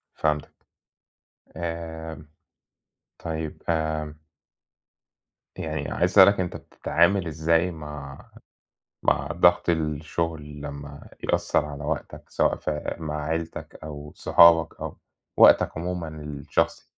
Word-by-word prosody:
فهمتك. 75 -1 -1 1.0
آمم، 80 -2 -6 0.9
طيب، 80 -1 -5
آمم 80 -2 -1 1.4
يعني 75 -2 -4
عايز - - +1
أسألك 100 -1 +7
أنت 90 -1 -2
بتتعامل 85 +2 +1
إزاي 80 +3 +1
مع 75 -3 -9 0.7
مع - - +2
ضَغْط 85 0 +4
الشُغل 75 -1 -2
لمّا 70 0 -8
يأثّر - - +1
على 75 -1 -7
وقتك 75 +1 -4
سواء - - +2
في 75 -1 -3
مع 75 -2 -4
عيلتك 80 +1 -4
أو 75 -1 -8
صحابك 85 -1 +5
أو - - -5 0.4
وقتك - - +6
عمومًا 90 0 -3
الشخصي؟ 75 -2 -2
80 Hz, 100 wpm, -25 LUFS, 75-85 Hz, 1.4 s, أسألك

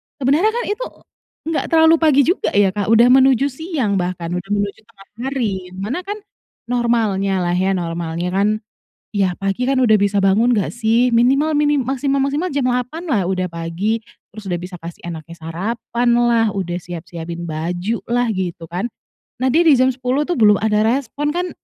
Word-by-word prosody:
sebenernya 290 +8 +2
kan 475 +2 -1
itu 420 +5 -3 0.6
nggak 325 - -1
terlalu 325 0 +5
pagi 295 -4 +4
juga 350 +8 +1
ya, 200 -2 +4
Kak, 205 0 -3
udah 230 +2 +5
menuju 265 +1 +4
siang 260 - -2
bahkan 175 -1 -3
udah 180 +2 -4
menuju 205 0 -2
tengah 195 -4 -19 0.2
hari, 210 -9 -2
mana 210 - -3
kan 410 - -2 0.6
normalnya 210 -6 +1
lah 175 - 0
ya, 190 +2 +1
normalnya 170 0 -3
kan, 195 +2 +2 0.6
ya 195 -4 0
pagi 195 +6 -1
kan 265 0 +2
udah 220 -4 +5
bisa 200 0 +1
bangun 220 +6 +3
nggak 205 -4 0
sih? 235 +1 +2
Minimal 270 +6 +3
minim 295 -1 +2
maksimal-maksimal 275 +5 -1
jam 270 -3 +1
8 250 +7 -2
lah 210 -10 +1
udah 185 0 -1
pagi, 170 +6 -2 0.3
terus 215 -1 -11
udah 175 -2 -2
bisa 180 +1 -8
kasih 165 +1 -9
anaknya 165 0 -8
sarapan 225 +8 -2
lah, 235 -1 +3
udah 180 -3 -3
siap-siapin 170 -1 -7
baju 175 +8 -2
lah 245 0 +2
gitu 175 -4 -4
kan. 180 +5 -3 0.6
Nah 260 - +2
dia 325 +6 +4
di 315 - +7
jam 255 +1 +3
10 255 +3 -1
tuh 350 - 0
belum 210 -2 +6
ada 215 0 +2
respon 280 +4 -1
kan, 360 +1 -1
220 Hz, 175 wpm, -19 LUFS, 185-265 Hz, 0.6 s, di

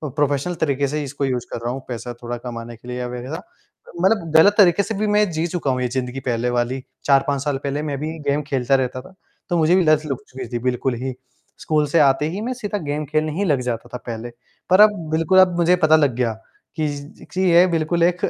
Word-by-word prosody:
Professional 145 +3 0
तरीके 140 -1 +1
से 150 +1 -2
इसको 140 0 -3
यूज़ 125 -2 -2
कर - - -4
रहा 120 - 0
हूँ 135 - -6
पैसा 120 0 -5
थोड़ा 120 0 -4
कमाने 120 -1 -7
के 120 +2 -17
लिए 125 - -4
या 125 - -3
वगैरह। 125 +5 -6
अ, - - -9 0.6
मतलब 190 -5 +2
गलत 200 +6 +7
तरीके 195 -1 +5
से 220 +1 -4
भी 215 - +1
मैं 210 -2 +3
जी 160 +1 -1
चुका 165 -6 -1
हूँ 125 0 -1
ये 125 - +1
ज़िंदगी 125 +1 -3
पहले 120 0 0
वाली, 120 +2 -1 0.2
4-5 140 0 +2
साल 145 -2 -1
पहले 140 +1 -2
मैं 140 - -2
भी 160 +2 -4
गेम 145 +1 +1
खेलता 130 0 +2
रहता 130 -1 -1
था, 185 - -16 0.4
तो 175 - +1
मुझे 160 +2 +4
भी 185 - +4
लत 155 -1 +3
लग 135 -4 -2
चुकी 130 -1 -7
थी 120 - -1
बिल्कुल 125 0 -1
ही। 130 -1 -2 0.5
स्कूल 150 -1 +1
से 165 +4 +2
आते 140 +1 +3
ही 185 - -4
मैं 245 +3 -2
सीधा 210 -4 -4
गेम 145 +1 -2
खेलने 155 +1 0
ही 195 +6 -1
लग 145 -6 +2
जाता 120 -2 -4
था - - -2
पहले। 115 +1 -5 0.4
पर 185 +3 +6
अब 215 - +8 0.2
बिल्कुल 165 +4 +3
अब 185 -2 +5
मुझे 175 +1 +4
पता 155 0 +6
लग 145 -6 +2
गया, 120 -3 0 0.4
कि 155 -2 0
ज 145 0 -8
कि 185 - -1
यह 175 +2 +6
बिल्कुल 165 +1 +1
एक 175 +1 +2
145 Hz, 245 wpm, -21 LUFS, 125-165 Hz, 0.6 s, अब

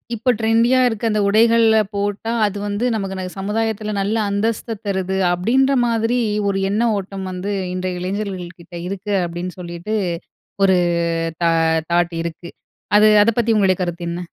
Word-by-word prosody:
இப்போ 235 +3 -1
ட்ரெண்டியா 230 +3 +3
இருக்க 225 -2 -3
அந்த 210 -1 +1
உடைகள்ல 225 +1 +4 0.2
போட்டா, 205 +2 -2
அது 205 -1 -2
வந்து 205 +4 -1
நமக்கு 195 -3 -3
ந - - -3
சமுதாயத்தில 215 +1 -2
நல்ல 200 +3 0
அந்தஸ்த 220 +2 -2
தருது 190 -1 -1
அப்பிடின்ற 245 +10 +2
மாதிரி 230 +1 +1 0.3
ஒரு 195 - 0
எண்ண 210 +3 0 0.2
ஓட்டம் 195 0 -6
வந்து 185 +3 -4 0.2
இன்றைய 185 0 -3
இளைஞர்கள்கிட்ட 180 -3 -5
இருக்கு, 200 +2 -4
அப்பிடின்னு 175 +2 -5
சொல்லிட்டு 175 +4 -5 0.7
ஒரு 190 -1 +5 0.7
தா 170 - +4 0.4
தாட் 175 0 +2
இருக்கு. 170 +1 -7 0.5
அது 210 +1 +6 0.2
அத 220 - +3
பத்தி 230 -1 +2
உங்களுடைய 190 -3 +3
கருத்து 175 -1 -3
என்ன? 170 +1 -4
200 Hz, 145 wpm, -20 LUFS, 180-220 Hz, 0.7 s, அது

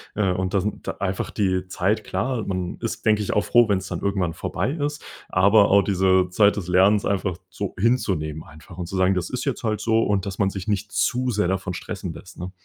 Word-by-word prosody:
Äh, 100 -3 +1
und 90 0 -2
das 95 -1 +1
n 105 - -3
da - - -3
einfach 95 -1 -2
die 95 -3 0
Zeit 95 +3 0
klar. 125 -4 -2
Man 90 -2 -3
ist, 115 -1 -5
denke 105 -1 +3
ich 105 - -2
auch 105 - +2
froh, 120 -2 +4
wenn 100 - +3
es 95 +1 -6
dann - - -4
irgendwann 95 -4 0
vorbei 85 - -2
ist. 145 -1 -3 0.3
Aber 100 +3 +5
auch 100 0 +5
diese 95 -1 +2
Zeit 100 +2 +4
des 95 -4 -4
Lernens 95 +3 +4
einfach 95 -3 -1
so 100 -2 -5
hinzunehmen 90 -9 0
einfach 80 +4 -14
und 90 - -4
zu 95 - -6
sagen: 95 +1 +3
„Das 90 -2 -2
ist 125 - -4
jetzt 135 -3 -2
halt 110 -2 -1
so,” 115 +1 +2
und, 100 -2 0
dass 100 -1 -6
man 100 -2 +3
sich 95 +1 -7
nicht 105 0 -1
zu 125 +1 0
sehr 105 -5 +1
davon 95 0 -2
stressen 95 -2 -5
lässt, 95 - -13
ne? 90 +1 -5
100 Hz, 235 wpm, -23 LUFS, 90-105 Hz, 0.3 s, Aber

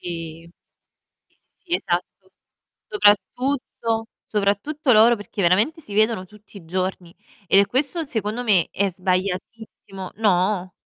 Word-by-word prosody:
Sì, 165 -1 -7 0.8
sì, - - -40 0.2
sì, 350 -1 -7
esatto. 185 - -4 0.6
Soprattutto 245 - +1 0.2
soprattutto 220 +8 0
loro 230 +2 +6
perché 205 -1 -6
veramente 210 - +2
si 205 - -9
vedono 215 -3 +2
tutti 210 +1 -16
i 170 - -13
giorni 185 0 -3 0.3
e 200 +2 +5
questo, 285 - -1
secondo 220 0 -3
me, 195 -7 +3
è 200 0 0
sbagliatissimo 190 +1 -4
No? 185 -3 +1
205 Hz, 115 wpm, -22 LUFS, 185-230 Hz, 0.8 s, loro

